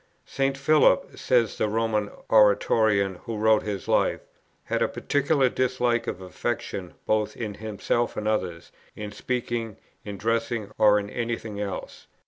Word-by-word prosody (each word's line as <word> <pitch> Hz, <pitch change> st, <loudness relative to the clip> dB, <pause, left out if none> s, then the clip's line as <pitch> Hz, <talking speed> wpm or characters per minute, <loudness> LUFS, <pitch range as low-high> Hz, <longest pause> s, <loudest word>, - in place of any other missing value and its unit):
"St. 135 Hz, 0 st, -1 dB
Philip," 150 Hz, +3 st, +3 dB
says 120 Hz, -4 st, +1 dB
the 105 Hz, -, +1 dB
Roman 110 Hz, -1 st, 0 dB, 0.2 s
Oratorian 105 Hz, -2 st, +4 dB
who 115 Hz, -2 st, -4 dB
wrote 110 Hz, 0 st, +4 dB
his 100 Hz, -3 st, -5 dB
Life, -, -, +2 dB, 0.4 s
"had -, -, -2 dB
a -, -, +3 dB
particular 140 Hz, -1 st, +1 dB
dislike 125 Hz, -2 st, 0 dB
of 95 Hz, -, -4 dB
affectation 95 Hz, -1 st, -4 dB
both 110 Hz, -1 st, 0 dB
in 105 Hz, -3 st, -4 dB
himself 110 Hz, +3 st, -2 dB
and 105 Hz, -, -2 dB
others, 90 Hz, -6 st, -2 dB, 0.2 s
in 105 Hz, -1 st, -6 dB
speaking, 115 Hz, 0 st, -3 dB, 0.3 s
in 100 Hz, -1 st, -6 dB
dressing, 115 Hz, 0 st, -1 dB
or 105 Hz, -1 st, +6 dB
in 100 Hz, -1 st, -2 dB
any 120 Hz, -1 st, -1 dB
thing 105 Hz, -3 st, -8 dB
else. 100 Hz, -2 st, -6 dB
110 Hz, 145 wpm, -26 LUFS, 105-120 Hz, 0.4 s, or